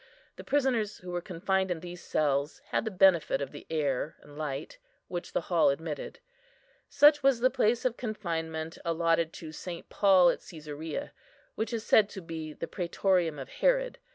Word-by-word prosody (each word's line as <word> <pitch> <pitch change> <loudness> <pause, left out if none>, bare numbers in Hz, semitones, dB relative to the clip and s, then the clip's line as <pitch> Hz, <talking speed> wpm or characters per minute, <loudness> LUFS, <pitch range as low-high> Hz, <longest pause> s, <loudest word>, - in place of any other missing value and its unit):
The - - -9
prisoners, 255 -7 +1
who 180 0 -9
were 175 0 -2
confined 190 +1 -1
in 175 -2 -1
these 175 0 -8
cells, 145 0 0
had - - 0
the - - 0
benefit 185 -7 +4
of 140 - -4
the 145 - -11
air 150 -2 -1
and 145 - -15
light, 150 - -5 0.3
which 175 0 -5
the - - +1
hall 170 -3 +3
admitted. 150 - -4 0.7
Such 295 +1 +6
was 270 -3 +4
the 255 +2 +3
place 240 -2 +1
of 245 -2 +1
confinement 165 -8 -4
allotted 165 -1 +1
to 160 -2 -8
St. 170 +1 -7
Paul 185 -4 +5
at - - -5
Cæsarea, 155 - -6 0.4
which 220 +1 -3
is 230 -2 -3
said 210 -2 +5
to 195 - -8
be 160 -2 -6
the 160 - -5
"prætorium 175 -3 0
of 135 - -7
Herod." - - +1
175 Hz, 175 wpm, -29 LUFS, 160-215 Hz, 0.7 s, Such